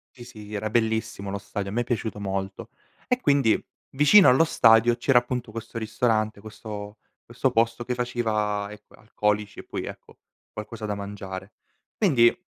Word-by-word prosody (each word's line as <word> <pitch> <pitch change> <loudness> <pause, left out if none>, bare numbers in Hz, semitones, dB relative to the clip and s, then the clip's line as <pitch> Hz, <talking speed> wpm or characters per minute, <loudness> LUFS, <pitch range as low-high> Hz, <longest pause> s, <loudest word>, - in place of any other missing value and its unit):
Sì, 120 - -11
sì 105 -3 -10
era 110 +1 -2
bellissimo 110 -3 -1
lo 100 - -3
stadio, 100 0 -5
a - - -7
me 120 +3 +1
è - - -7
piaciuto 110 -3 -3
molto. 95 +2 -4 0.4
E 250 0 +1
quindi 140 - +3 0.3
vicino 150 +9 +6
allo 130 +6 +6
stadio 115 -4 +5
c'era, 125 +1 +4
appunto, 120 -1 -3
questo 115 +1 -6
ristorante 110 -1 0
questo 105 0 -8 0.3
questo 125 +2 0
posto 115 0 +1
che 125 - -2
faceva, 110 -4 -1
ecco, 105 - -15
alcolici, 105 -1 -2
e - - -12
poi, - - -5
ecco, - - -10 0.3
qualcosa 110 +1 -7
da 105 -1 -2
mangiare. 100 0 -7 0.4
Quindi 130 - +4
110 Hz, 165 wpm, -25 LUFS, 105-120 Hz, 0.4 s, vicino